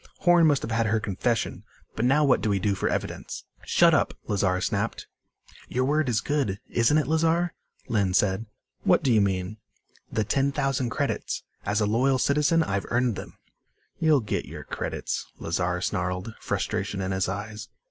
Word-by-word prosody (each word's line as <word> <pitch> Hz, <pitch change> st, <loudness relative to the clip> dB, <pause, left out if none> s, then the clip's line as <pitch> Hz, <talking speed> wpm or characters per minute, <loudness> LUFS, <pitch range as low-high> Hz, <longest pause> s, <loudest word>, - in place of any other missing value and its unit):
"Horn 175 Hz, -2 st, +6 dB
must 145 Hz, -3 st, +2 dB
have -, -, -4 dB
had 115 Hz, 0 st, +1 dB
her 110 Hz, +1 st, +2 dB
confession. 110 Hz, +3 st, -1 dB, 0.3 s
But 110 Hz, -, 0 dB
now 140 Hz, +4 st, +4 dB
what 135 Hz, -, +3 dB
do 110 Hz, -, 0 dB
we 100 Hz, -, +2 dB
do 100 Hz, +1 st, +1 dB
for 95 Hz, -, -1 dB
evidence?" -, -, -4 dB, 0.2 s
"Shut -, -, +5 dB
up!" -, -, +2 dB
Lazar 95 Hz, -3 st, +1 dB
snapped. 100 Hz, +3 st, -2 dB, 0.6 s
"Your 130 Hz, +1 st, 0 dB
word 150 Hz, 0 st, +1 dB
is 115 Hz, -3 st, +1 dB
good, 135 Hz, -10 st, -1 dB
isn't 120 Hz, +6 st, +3 dB
it, 155 Hz, -, +2 dB
Lazar?" 165 Hz, +3 st, +1 dB, 0.3 s
Lynn 100 Hz, -4 st, +1 dB
said. 100 Hz, +2 st, +1 dB, 0.3 s
"What -, -, +3 dB
do 130 Hz, -, +3 dB
you 110 Hz, -, +5 dB
mean?" 95 Hz, +1 st, -1 dB, 0.5 s
"The 110 Hz, -, +1 dB
ten 135 Hz, +6 st, +1 dB
thousand 135 Hz, -3 st, 0 dB
credits. -, -, -2 dB, 0.2 s
As 105 Hz, +1 st, +1 dB
a -, -, +3 dB
loyal 130 Hz, +6 st, +2 dB
citizen 150 Hz, +5 st, +3 dB
I've 100 Hz, -7 st, -2 dB
earned 120 Hz, -2 st, +1 dB
them." -, -, -9 dB, 0.6 s
"You'll 155 Hz, -4 st, +4 dB
get 105 Hz, -, -2 dB
your -, -, -8 dB
credits," -, -, -4 dB
Lazar 90 Hz, +1 st, -1 dB
snarled, 90 Hz, +4 st, -2 dB
frustration 100 Hz, -, -2 dB
in 95 Hz, 0 st, -2 dB
his 95 Hz, -1 st, 0 dB
eyes. 105 Hz, +2 st, -5 dB
115 Hz, 175 wpm, -26 LUFS, 100-135 Hz, 0.6 s, Horn